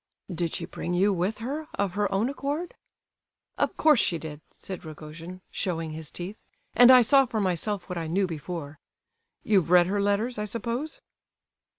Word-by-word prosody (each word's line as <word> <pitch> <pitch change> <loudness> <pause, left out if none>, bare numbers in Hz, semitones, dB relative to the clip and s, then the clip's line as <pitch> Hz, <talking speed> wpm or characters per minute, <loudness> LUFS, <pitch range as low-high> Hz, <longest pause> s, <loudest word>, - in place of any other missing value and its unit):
"Did 170 -1 -1
she - - -3
bring 175 - -4
you 195 +3 +3
with 190 +4 -1
her 300 +4 -4
of 200 -3 -1
her 205 -1 0
own 195 +4 +1
accord?" 285 +5 -3 0.9
"Of - - 0
course 305 -5 +5
she 170 - +2
did!" 155 -2 -8
said 190 -2 -8
Rogojin, 160 +3 -9
showing 165 -4 -2
his 155 0 -7
teeth; 185 +5 -7 0.4
"and 245 0 +8
I 255 -1 +9
saw 270 +3 +5
for 225 - -2
myself 195 +1 -1
what 180 -1 -4
I 165 - -4
knew 190 +5 +1
before. 155 -3 -6 0.6
You've 195 -6 +2
read 180 0 +7
her 200 +3 0
letters, 210 +4 0
I 210 - -1
suppose?" 235 +8 -4
195 Hz, 175 wpm, -27 LUFS, 170-230 Hz, 0.9 s, I